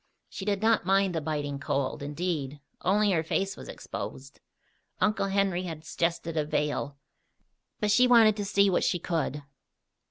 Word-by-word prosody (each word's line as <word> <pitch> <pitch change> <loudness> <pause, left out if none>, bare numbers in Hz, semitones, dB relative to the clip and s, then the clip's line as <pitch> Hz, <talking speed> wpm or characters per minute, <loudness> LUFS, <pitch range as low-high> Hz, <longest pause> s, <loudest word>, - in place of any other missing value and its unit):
She 190 - -7
did 205 0 -1
not 225 0 +3
mind 195 0 +2
the 160 - -1
biting 145 -2 -3
cold, 140 -1 -2
indeed, 150 -1 -3 0.2
only 205 +2 +3
her 165 -4 +2
face 190 +4 -1
was - - -10
exposed. - - -7 0.6
Uncle 210 -2 +1
Henry 195 -2 +1
had 160 -2 -7
suggested 170 -1 -2
a 155 - +1
veil; 145 -1 -2 0.8
but 210 -1 +1
she 250 +4 +5
wanted 225 -4 +6
to 205 - -2
see 200 0 +3
what 185 - +2
she - - +2
could. 160 -4 -2
175 Hz, 160 wpm, -28 LUFS, 150-200 Hz, 0.8 s, wanted